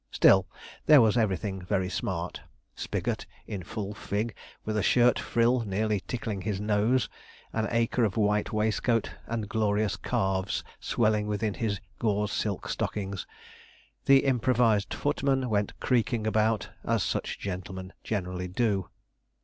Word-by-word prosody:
Still 95 -1 +5 0.4
there 150 -2 +9
was 110 -2 +4
everything 100 -3 0
very 95 0 0
smart; 90 -1 -3 0.3
Spigot - - -3 0.2
in 100 -3 -5
full 100 +3 -5
fig, 105 +2 -2 0.3
with 110 - -2
a 105 - +2
shirt 120 +5 +4
frill 120 +2 +2
nearly 105 -1 0
tickling 110 -2 -4
his 100 -1 -2
nose, 105 +4 +2 0.5
an 110 -1 0
acre 115 +1 +1
of 105 -3 0
white 105 -1 +2
waistcoat, 110 +2 +1 0.2
and 110 -2 -2
glorious 105 -1 +1
calves 95 0 -1 0.2
swelling 105 -2 +1
within 105 0 -1
his 105 -4 -2 0.2
gauze 105 -2 +1
silk 100 -3 -2
stockings. 100 -2 -3 0.8
The 135 0 +6
improvised 120 -5 +2
footman 135 -3 0
went 100 -1 0
creaking 120 -3 +1
about, 110 0 +1
as - - +1
such - - -2
gentlemen 95 0 -6
generally 90 -3 -3
do. 100 -1 0
105 Hz, 135 wpm, -28 LUFS, 100-115 Hz, 0.8 s, there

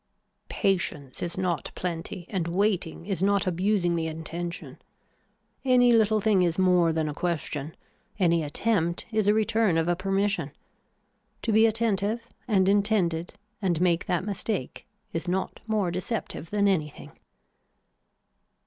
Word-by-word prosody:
Patience 170 -8 -1
is 175 0 -3
not 180 -4 -1
plenty 175 0 -4
and 185 -5 -1
waiting 180 -2 0
is 195 -2 -2
not 200 0 +2
abusing 180 0 +1
the 165 -1 -1
intention. 165 +2 -6 0.8
Any 250 -2 +5
little 220 -1 +4
thing 205 -2 +3
is 170 -2 +1
more 180 -3 +4
than 160 -1 -1
a 150 - -3
question. 155 -3 -3 0.4
Any 170 -4 +3
attempt 170 +2 0
is 215 -2 +1
a 205 - +6
return 220 -4 +2
of 165 0 +1
a 175 - +2
permission. 195 -5 -1 0.9
To 230 - 0
be 220 +1 +6
attentive 220 -1 0 0.3
and 195 -5 +3
intended 195 -5 +1 0.3
and 175 -5 +1
make 175 -1 +1
that 180 +1 0
mistake 205 - -3 0.3
is 165 +1 -3
not 190 +2 -2
more 210 -5 0
deceptive 180 -3 -4
than 205 -1 +2
anything. 155 -7 -1
185 Hz, 135 wpm, -27 LUFS, 170-205 Hz, 0.9 s, a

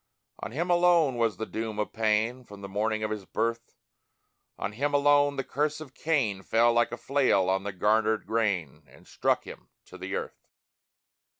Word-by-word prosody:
On - - -6
him 170 +8 -1
alone 175 -6 +4
was 115 -2 +1
the 110 - -3
doom 110 -1 -5
of 105 - -3
pain, 110 +3 0
From 100 -4 -13
the 100 - -6
morning 110 +2 -1
of 110 - -2
his 105 -3 -4
birth; 115 +1 -3 0.8
On 100 - -3
him 145 +7 -1
alone 145 0 +4
the 135 - -2
curse 150 +4 -1
of 150 -4 -10
Cain 130 -14 0
Fell, 115 +4 +3
like 120 0 +2
a 120 - -5
flail 130 -10 +2
on 95 +1 -1
the 100 - -2
garnered 110 +3 +1
grain, 90 - -1
And 65 - -19
struck - - 0
him - - -12 0.2
to - - -13
the - - -4
earth! - - -6
115 Hz, 185 wpm, -28 LUFS, 105-140 Hz, 0.8 s, alone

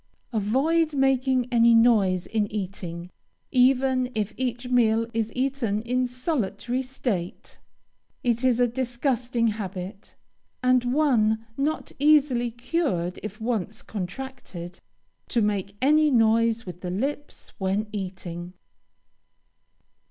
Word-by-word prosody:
Avoid 290 +9 +1
making 265 -2 +2
any 235 -1 +5
noise 205 -6 +4
in 210 -2 -1
eating, 180 -4 -5 0.4
even 255 0 +3
if 215 -1 -1
each 250 -1 -3
meal 230 -2 +3
is 225 -1 -1
eaten 250 -5 -1
in 250 +1 0
solitary 250 - -2
state. 240 -9 -4 0.6
It 240 0 +1
is 250 -2 +3
a 245 - +4
disgusting 245 -1 0
habit, 195 -2 -6 0.5
and 255 -1 +3
one 225 -7 +2
not 295 +4 -2
easily 280 -5 +4
cured 235 - -2
if 210 +1 -7
once 220 -2 -2
contracted, 190 -4 -7 0.5
to 240 - 0
make 200 -2 -1
any 305 +2 +5
noise 230 -2 +3
with 180 -1 -8
the 180 - -4
lips 275 +10 -4
when 195 +2 0
eating. 180 -3 -6
235 Hz, 110 wpm, -25 LUFS, 205-260 Hz, 0.6 s, any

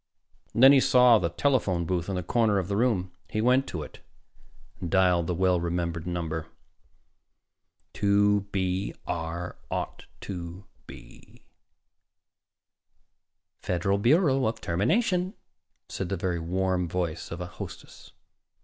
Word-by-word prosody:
And 115 - +3
then 135 - +10
he 140 - +7
saw 125 -3 +6
the 85 - -1
telephone 95 -6 +1
booth 90 0 -2
in 95 - -2
the 90 - -2
corner 110 +2 +2
of 95 -2 -1
the 100 - -2
room. 100 -6 +1 0.2
He 110 - -2
went 125 +4 +3
to 80 -4 -4
it, - - -12 0.8
dialed 90 -1 +2
the 90 - -1
well 90 0 +2
remembered 85 -1 -2
number: 80 -2 -3 1.5
"2 100 0 +2
B 95 0 -1
R 85 +1 -4
0 - - -3 0.2
2 90 0 -7 0.2
B." - - -14 2.2
"Federal 95 +3 0
Bureau 135 - +3
of 110 - -3
Termination," 180 - 0 0.5
said 95 - -4
the 100 - -2
very 90 -1 -2
warm 90 +1 -1
voice 85 -2 -3
of 85 - -6
a 90 - -4
hostess. 90 - -10
95 Hz, 130 wpm, -27 LUFS, 85-110 Hz, 2.2 s, then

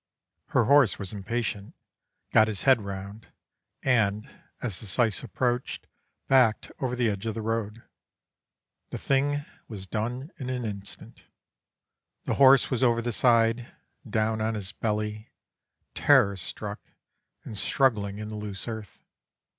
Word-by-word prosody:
Her - - +2
horse 140 -6 +5
was 100 -1 -4
impatient, 105 0 -3 0.6
got 110 - +6
his 105 -3 -3
head 130 -4 +5
round, 100 +1 -7 0.6
and, 110 -3 +2 0.3
as 110 -8 -3
the 110 - -8
syce 110 +1 +2
approached, 125 +1 -2 0.4
backed 125 -5 +3
over 125 -2 -1
the 120 -2 +1
edge 100 +1 -2
of 110 - -2
the 110 - -4
road. 115 0 -3 1.1
The - - -5
thing 145 +1 0 0.2
was 100 -4 -7
done 120 - -4
in 130 -2 -4
an 125 -2 -2
instant, 100 -2 -8 1.0
the - - -1
horse 135 -1 +7
was 125 - 0
over 120 -2 +3
the 120 0 -2
side, 115 0 +3 0.4
down 110 0 0
on 110 +1 0
his 100 -3 -3
belly, 105 0 -3 0.6
terror 100 0 +4
struck 100 +3 -6 0.6
and 110 - -8
struggling 105 -4 +1
in 105 0 -6
the 110 - -6
loose 105 -1 -6
earth. 110 -4 -7
110 Hz, 140 wpm, -27 LUFS, 105-125 Hz, 1.1 s, horse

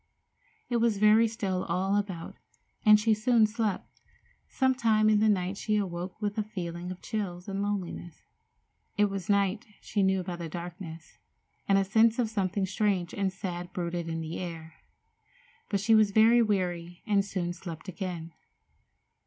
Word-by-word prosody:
It 240 - 0
was 230 -3 +2
very 215 +2 +5
still 200 -5 -2
all 190 +4 0
about, 190 -5 -3 0.5
and 215 -1 +7
she 220 +1 +3
soon 220 +1 +4
slept. 215 -2 -3 0.5
Some 260 -1 +2
time 220 -4 +3
in 210 - +4
the 215 +1 +4
night 190 -1 0
she 215 - -1
awoke 180 -1 -4
with 210 0 -2
a - - +1
feeling 175 -4 -6
of 185 - -9
chill 185 -5 -4
and 195 0 -3
loneliness. 190 -4 -4 0.7
It 205 -1 +3
was 195 -2 -5
night, 200 +3 +1
she 205 - -2
knew 190 -1 +2
by 175 -1 -5
the 170 -2 -6
darkness, 170 -1 -8 0.5
and 195 - +4
a 195 - +3
sense 220 +3 +4
of 235 -3 0
something 195 -2 0
strange 190 -2 0
and 195 -2 0
sad 180 -2 -6
brooded 170 -1 -3
in 165 0 -3
the 160 +1 -5
air. 165 -2 -7 1.0
But 200 - 0
she 220 +3 +3
was 215 -2 +6
very 225 +3 +5
weary, 175 -5 -1
and 205 -3 +2
soon 185 -3 -3
slept 170 -1 -9
again. 175 -3 -5
195 Hz, 165 wpm, -29 LUFS, 175-215 Hz, 1.0 s, and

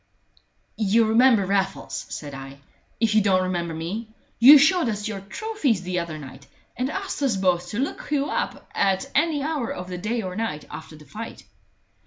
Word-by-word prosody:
"You'll 220 +1 +3
remember 230 -2 +5
Raffles," 195 0 -2
said 145 -2 -6
I, 135 0 -9 0.4
"if 225 -2 +2
you 215 - +5
don't 190 -2 +3
remember 170 -3 -2
me. 185 +8 -4 0.3
You 270 +6 +11
showed 315 -1 +4
us 210 0 -3
your 210 -2 -4
trophies 275 - -1
the 180 0 -1
other 170 -2 -5
night, 135 -2 -11 0.3
and 255 +2 -1
asked 390 -1 -4
us 260 -8 +1
both 180 -2 +1
to 205 - -5
look 270 +4 -3
you 285 -2 +1
up - - -3
at 195 +7 0
any 300 -1 +2
hour 295 -6 -2
of 180 0 -6
the 180 -1 -5
day 225 +4 -2
or 185 -1 -5
night 200 -9 -3
after 160 0 -9
the 150 0 -15
fight." 225 +6 -8
205 Hz, 185 wpm, -24 LUFS, 180-255 Hz, 0.4 s, You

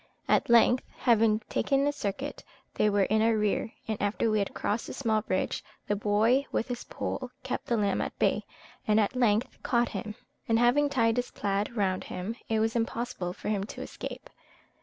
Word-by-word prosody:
At - - +2
length, 235 +2 +5
having 225 -3 +3
taken 275 0 +1
a 290 - +2
circuit, 270 +3 -4 0.3
they 210 - +2
were 200 -1 +3
in 215 +3 +2
our 225 0 +3
rear; 210 +1 0 0.2
and 220 -2 -2
after 210 +2 +1
we 215 - +2
had 200 - -2
crossed 215 +3 -2
a - - -5
small 220 -5 +1
bridge, 185 -2 -1 0.2
the 205 - +1
boy 215 +7 +2
with 230 - -1
his 245 -1 -4
pole 255 -2 -4
kept 260 - -4
the 235 - +1
lamb 200 -2 +1
at - - -4
bay, - - +2 0.4
and 215 0 +4
at 215 +4 +1
length 230 -2 +1
caught 240 -1 +1
him; 215 -2 -5 0.3
and 225 - +4
having 250 +5 +4
tied 230 -4 +2
his 245 0 -1
plaid 200 +3 -2
round 190 -2 0
him, 185 +5 -4
it 220 -1 +2
was 225 +1 +1
impossible 230 -5 -2
for 185 - -6
him 205 -2 0
to - - -8
escape. - - -7
220 Hz, 195 wpm, -29 LUFS, 205-240 Hz, 0.4 s, length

